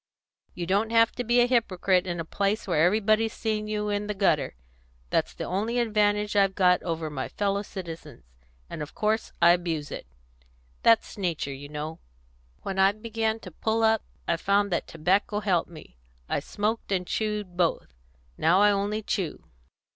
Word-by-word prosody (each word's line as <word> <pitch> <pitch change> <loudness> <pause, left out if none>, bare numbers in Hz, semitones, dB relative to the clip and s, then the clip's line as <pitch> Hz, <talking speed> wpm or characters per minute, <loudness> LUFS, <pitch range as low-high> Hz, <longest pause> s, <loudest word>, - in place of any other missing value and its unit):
You 175 - -3
don't 200 +5 +1
have 230 0 +4
to 245 - -4
be 240 +1 +4
a - - +5
hypocrite 190 -6 +1
in 175 -1 -3
a 165 - -3
place 200 +5 -1
where 160 -5 +2
everybody's 215 +4 +3
seen 215 -1 -2
you 210 0 -2
in 205 0 -1
the 210 - -3
gutter; 160 - +1 0.6
that's - - 0
the - - -5
only 215 +6 -1
advantage 210 -2 +1
I've 195 -1 +3
got 180 -2 +4
over 165 -2 -3
my 130 -3 -3
fellow 200 -1 -1
citizens, 165 - -8 0.4
and 155 - -7
of 150 - -7
course 215 +1 0
I 170 - +8
abuse 165 -4 -1
it; - - -7 0.7
that's 225 -2 +3
nature, 165 -7 -2
you 140 +1 -9
know. 150 +2 -5 0.6
When 195 0 -3
I 195 +1 +5
began 220 0 -2
to 185 - -10
pull 220 +6 -1
up 220 -1 +4 0.3
I 170 - +1
found 200 +2 +1
that 170 - -1
tobacco 190 +6 +1
helped 190 -5 +1
me; 155 - -13 0.3
I - - 0
smoked 215 +1 -3
and 185 -2 0
chewed 210 -3 -2
both; 170 - 0 0.5
now 175 +4 +4
I 205 0 +6
only 205 +2 -1
chew. 185 -6 -3
200 Hz, 175 wpm, -27 LUFS, 175-215 Hz, 0.7 s, I